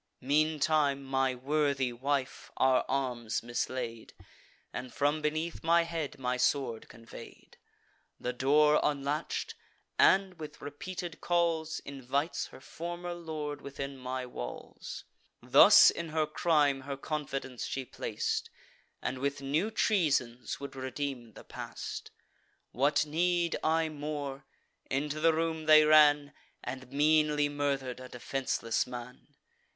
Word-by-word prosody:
Meantime 150 Hz, 0 st, +2 dB
my 135 Hz, -1 st, 0 dB
worthy 135 Hz, -1 st, 0 dB
wife 135 Hz, +2 st, -2 dB
our 130 Hz, -1 st, +4 dB
arms 125 Hz, -5 st, -1 dB
mislaid, 120 Hz, -1 st, -4 dB, 0.6 s
And 125 Hz, -1 st, -5 dB
from 145 Hz, +4 st, +1 dB
beneath 155 Hz, +2 st, -2 dB
my 170 Hz, +1 st, +4 dB
head 165 Hz, -4 st, -4 dB
my 125 Hz, -1 st, -1 dB
sword 125 Hz, -3 st, 0 dB
convey'd; 115 Hz, 0 st, -13 dB, 0.6 s
The 125 Hz, -, -3 dB
door 150 Hz, +4 st, +4 dB
unlatch'd, 145 Hz, +2 st, -1 dB, 0.5 s
and, 190 Hz, -2 st, +4 dB
with 150 Hz, -1 st, -8 dB
repeated 170 Hz, +4 st, -6 dB
calls, 170 Hz, -2 st, 0 dB
Invites 140 Hz, +3 st, -2 dB
her -, -, -13 dB
former 175 Hz, +5 st, -6 dB
lord 155 Hz, -4 st, -5 dB
within 140 Hz, 0 st, -6 dB
my 130 Hz, 0 st, -4 dB
walls. 60 Hz, -, -7 dB, 0.4 s
Thus -, -, +8 dB
in 170 Hz, -1 st, -5 dB
her 155 Hz, 0 st, +1 dB
crime 150 Hz, -3 st, +2 dB
her 140 Hz, +1 st, -5 dB
confidence 135 Hz, -4 st, -4 dB
she 135 Hz, -1 st, -3 dB
plac'd, -, -, -3 dB, 0.5 s
And 130 Hz, -, -2 dB
with 140 Hz, +1 st, -1 dB
new 150 Hz, +10 st, 0 dB
treasons 145 Hz, -, 0 dB
would 140 Hz, -1 st, -7 dB
redeem 130 Hz, -3 st, -4 dB
the -, -, -12 dB
past. -, -, -7 dB, 0.6 s
What 145 Hz, +4 st, +2 dB
need 170 Hz, +2 st, +1 dB
I 160 Hz, +1 st, +2 dB
more? 145 Hz, -2 st, -5 dB, 0.4 s
Into 150 Hz, +3 st, -1 dB
the 165 Hz, +1 st, +5 dB
room 160 Hz, 0 st, -1 dB
they 155 Hz, 0 st, +8 dB
ran, 150 Hz, -1 st, +6 dB, 0.3 s
And 130 Hz, -1 st, -7 dB
meanly 150 Hz, 0 st, +3 dB
murder'd 140 Hz, -3 st, -2 dB
a 130 Hz, 0 st, -9 dB
defenceless 125 Hz, -2 st, -1 dB
man. 125 Hz, 0 st, -9 dB
145 Hz, 120 wpm, -31 LUFS, 130-155 Hz, 0.6 s, Thus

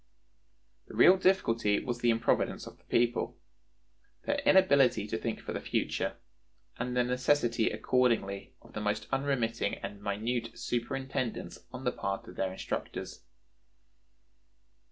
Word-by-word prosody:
The -, -, -10 dB
real 180 Hz, -, +8 dB
difficulty 115 Hz, -, +2 dB
was 120 Hz, -1 st, -3 dB
the 120 Hz, -, +2 dB
improvidence 115 Hz, 0 st, +1 dB
of -, -, -12 dB
the -, -, -28 dB
people; 120 Hz, 0 st, +1 dB, 0.9 s
their 290 Hz, -, 0 dB
inability 140 Hz, -, +4 dB
to 105 Hz, -, -3 dB
think 110 Hz, 0 st, -3 dB
for -, -, -5 dB
the -, -, -3 dB
future; -, -, -1 dB, 0.6 s
and 125 Hz, +1 st, -2 dB
the 125 Hz, -, +4 dB
necessity 125 Hz, -2 st, +2 dB
accordingly 115 Hz, -6 st, 0 dB
of -, -, -17 dB
the 105 Hz, -, -4 dB
most 105 Hz, 0 st, -1 dB
unremitting 135 Hz, -6 st, 0 dB
and 100 Hz, -1 st, -7 dB
minute 115 Hz, +4 st, -2 dB
superintendence 125 Hz, 0 st, -3 dB
on 130 Hz, 0 st, -7 dB
the 125 Hz, -, +1 dB
part 100 Hz, 0 st, -4 dB
of 90 Hz, -, -10 dB
their 95 Hz, -1 st, -1 dB
instructors. 95 Hz, -, -5 dB
120 Hz, 135 wpm, -31 LUFS, 105-130 Hz, 0.9 s, real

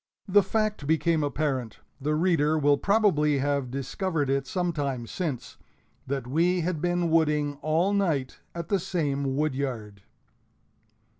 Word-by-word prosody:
The 205 Hz, +1 st, +5 dB
fact 210 Hz, -5 st, -1 dB
became 160 Hz, +1 st, +2 dB
apparent 140 Hz, -6 st, -2 dB, 0.2 s
the 150 Hz, +2 st, 0 dB
reader 160 Hz, -2 st, +2 dB
will 145 Hz, -1 st, +3 dB
probably 190 Hz, -9 st, +3 dB
have 140 Hz, -1 st, 0 dB
discovered 140 Hz, +3 st, -2 dB
it 135 Hz, -1 st, 0 dB
some 175 Hz, +3 st, -1 dB
time 135 Hz, -6 st, -2 dB
since 145 Hz, -2 st, -4 dB, 0.5 s
that 135 Hz, -2 st, -2 dB
we 170 Hz, +7 st, +1 dB
had 165 Hz, -2 st, -2 dB
been 175 Hz, -1 st, 0 dB
wooding 150 Hz, -3 st, +1 dB
all 165 Hz, +6 st, +1 dB
night 160 Hz, -10 st, 0 dB, 0.2 s
at 170 Hz, -1 st, -5 dB
the 200 Hz, -, +2 dB
same 140 Hz, -7 st, -1 dB
woodyard! 130 Hz, -9 st, -2 dB
150 Hz, 135 wpm, -27 LUFS, 140-175 Hz, 0.5 s, The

